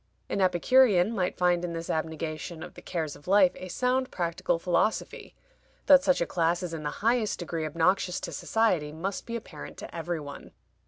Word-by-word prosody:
An 200 - -1
Epicurean 190 +2 +4
might 185 -4 -1
find 175 -1 +2
in 175 -1 -3
this 165 0 -5
abnegation 160 +1 -4
of - - -9
the 175 - -12
cares 160 -5 -3
of 145 - -17
life 190 -1 +5
a 185 - -8
sound 255 +6 0
practical 170 -1 -1
philosophy. 180 +5 -1 0.5
That 275 -1 +7
such 275 -7 +2
a - - +2
class 170 +1 0
is 175 -2 -4
in 160 - -4
the 150 - -2 0.2
highest 230 -2 +2
degree 165 -2 -3
obnoxious 175 +3 +1
to - - -5
society 185 -10 0
must 185 +6 -4
be 235 - -4
apparent 185 -10 -8
to - - -9
every 170 0 -3
one. 145 -1 -10
175 Hz, 190 wpm, -28 LUFS, 165-205 Hz, 0.5 s, That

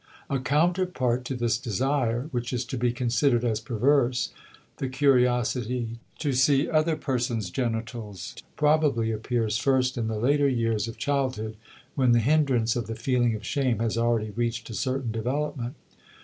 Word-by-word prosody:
A 135 - +1
counterpart 150 -4 +1
to 130 - -3
this 120 -2 0
desire 125 +1 0
which 120 -2 -2
is 125 0 -1
to 120 - -5
be 120 -1 +1
considered 120 +1 +1
as 110 -2 +1
perverse, 125 +2 +1 0.5
the 135 - -3
curiosity 125 -3 +1 0.2
to 145 -3 -1
see 135 +3 +3
other 155 0 +2
persons' 120 -9 -2
genitals, 115 -5 -4 0.2
probably 150 -7 +2
appears 110 0 -1
first 130 -1 +1
in 115 - -1
the 110 -1 -2
later 140 +5 +3
years 115 -4 0
of 115 - -7
childhood 130 -6 -1 0.4
when 130 -4 +3
the 120 - +5
hindrance 130 -3 +2
of 120 -2 -2
the 115 - -4
feeling 120 0 +1
of 110 - -8
shame 130 -5 0
has 115 0 -1
already 115 -2 +1
reached 115 +1 -2
a - - -6
certain 130 0 -2
development. 125 +3 -2
120 Hz, 155 wpm, -26 LUFS, 115-135 Hz, 0.5 s, the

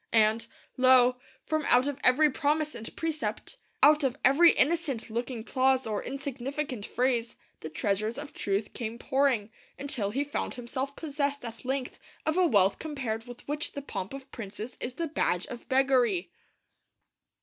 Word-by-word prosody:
And, 225 +1 +3 0.3
lo, 255 -1 +6 0.3
from 310 -1 0
out 250 +1 +5
of 285 -1 -3
every 295 +4 +5
promise 305 +2 0
and 225 - -7
precept, 310 - -3 0.3
out 300 0 +7
of 265 0 0
every 300 +6 +7
innocent 285 -7 0
looking 235 0 -3
clause 260 +1 +2
or 215 -2 -2
insignificant 275 -2 -4
phrase, 240 -1 0 0.2
the 155 - -6
treasures 210 - -1
of 290 0 -7
truth 200 +1 -2
came 230 -1 -5
pouring, 260 -5 +1 0.3
until 270 -8 -2
he 270 +7 0
found 290 - -3
himself 260 +3 -4
possessed 285 -3 -2
at 230 +2 -8
length 265 0 -3 0.3
of 315 - +1
a 365 -1 +4
wealth 200 - +3
compared 250 -7 -4
with 245 0 -11
which 300 +3 -2
the 285 - -5
pomp 190 -8 -5
of 270 0 -11
princes 215 +2 -7
is 250 +1 -5
the 335 - -2
badge 190 - 0
of 240 - -9
beggary. 255 -8 +2
255 Hz, 160 wpm, -29 LUFS, 230-285 Hz, 0.3 s, out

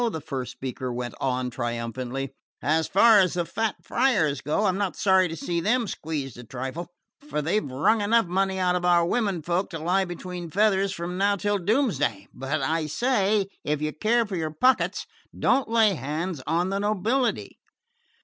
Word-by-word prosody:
the 160 - -4
first 135 -4 -5
speaker 130 -1 -5
went 120 -1 -4
on 125 -1 -1
triumphantly. 120 +3 -4 0.3
"As 160 +4 +1
far 215 +2 +6
as 185 -2 +2
the 175 -1 0
fat 220 +4 -1
friars 160 - +1
go, 155 +9 0
I'm 190 0 +1
not 200 -3 -1
sorry 190 -2 +4
to 165 - -6
see 170 +2 -2
them 230 +7 +1
squeezed 150 - -5
a - - -8
trifle, 130 +8 -5 0.4
for - - -1
they've 170 +8 0
wrung 145 - +1
enough 225 +2 +3
money 190 +2 0
out 180 -1 +2
of 180 - -1
our 175 -1 +4
women 195 -4 0
folk 175 +4 -1
to 165 - -5
lie 180 +5 +1
between 175 -1 -6
feathers 195 +1 +2
from 180 +1 -4
now 200 +1 +3
till 205 +1 0
doomsday; 170 - 0
but 135 +2 -2
I 160 +2 0
say, 210 - +1 0.2
if 150 0 -1
you 155 0 -2
care 230 +7 +2
for 200 -3 -5
your 160 -2 -2
pockets, 255 +13 +1 0.3
don't 260 -2 +2
lay 225 -3 +4
hands 155 +2 -3
on 175 +4 +1
the 195 - -1
nobility!" 215 +5 0
175 Hz, 180 wpm, -25 LUFS, 150-205 Hz, 0.4 s, far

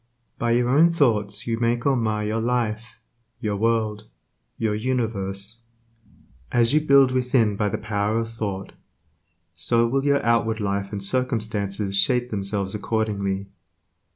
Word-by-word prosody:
By 120 0 +1
your 120 0 +2
own 155 +6 +5
thoughts 110 -9 +1
you 115 -1 -2
make 120 0 0
or 140 -1 +3
mar 110 -3 -1
your 110 +2 -1
life, 115 -1 -2 0.4
your 105 -4 -2
world, 110 -1 0 0.5
your 110 -2 0
universe, 110 -3 -2 0.9
As 120 +1 +3
you 155 - +4
build 140 -3 +5
within 125 -4 +2
by 105 0 0
the - - -2
power 105 +1 -1
of 115 0 -1
thought, 100 -4 -5 0.8
so 115 +9 +1
will 135 +3 0
your 140 -2 +2
outward 115 -1 +2
life 100 -1 -2
and 100 -2 -4
circumstances 105 -4 -1
shape 125 +4 +1
themselves 100 -1 -2
accordingly. 100 -2 -2
110 Hz, 140 wpm, -23 LUFS, 100-120 Hz, 0.9 s, own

